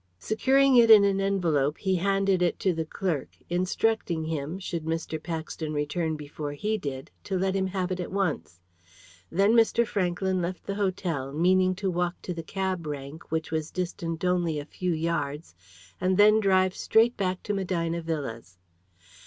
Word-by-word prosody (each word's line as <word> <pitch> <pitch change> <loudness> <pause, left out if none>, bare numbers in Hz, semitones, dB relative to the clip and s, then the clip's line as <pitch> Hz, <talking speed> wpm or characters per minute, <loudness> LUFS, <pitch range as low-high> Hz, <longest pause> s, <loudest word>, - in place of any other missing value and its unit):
Securing 265 - +3
it 230 -1 +6
in 215 -2 +9
an 195 -1 +2
envelope, 165 -7 +1
he 190 -2 0
handed 195 0 +1
it 175 - +1
to 185 - +1
the 160 -1 -2
clerk, 170 -6 -3
instructing 180 -2 0
him, 160 +1 -3
should 175 -4 -4
Mr. 160 -1 -3
Paxton 160 -1 -4
return 155 +2 -1
before 150 0 -6
he 210 +9 -1
did, 140 -9 -5
to 195 - -2
let 190 +1 0
him 190 -1 +1
have 185 -1 -2
it 185 - -2
at 180 - -4
once. 145 - -2 0.7
Then 200 +5 +3
Mr. 235 0 +4
Franklyn 185 -2 -1
left 175 +1 -4
the 200 - -3
hotel, 180 -9 -2
meaning 185 +4 +3
to 190 0 -2
walk 175 0 -1
to 180 - -3
the 170 - -5
cab 185 -1 -3
rank, 145 +3 -7
which 160 0 -2
was 155 -1 -2
distant 170 -2 -4
only 175 -3 +1
a 145 - -6
few 180 +3 -3
yards, 155 - -2 0.5
and 185 0 +2
then 215 +1 +6
drive 185 -2 +3
straight 230 +2 +3
back 185 -2 -2
to 210 - -2
Medina 170 -3 -1
Villas. 135 - -5
180 Hz, 170 wpm, -27 LUFS, 160-195 Hz, 0.7 s, in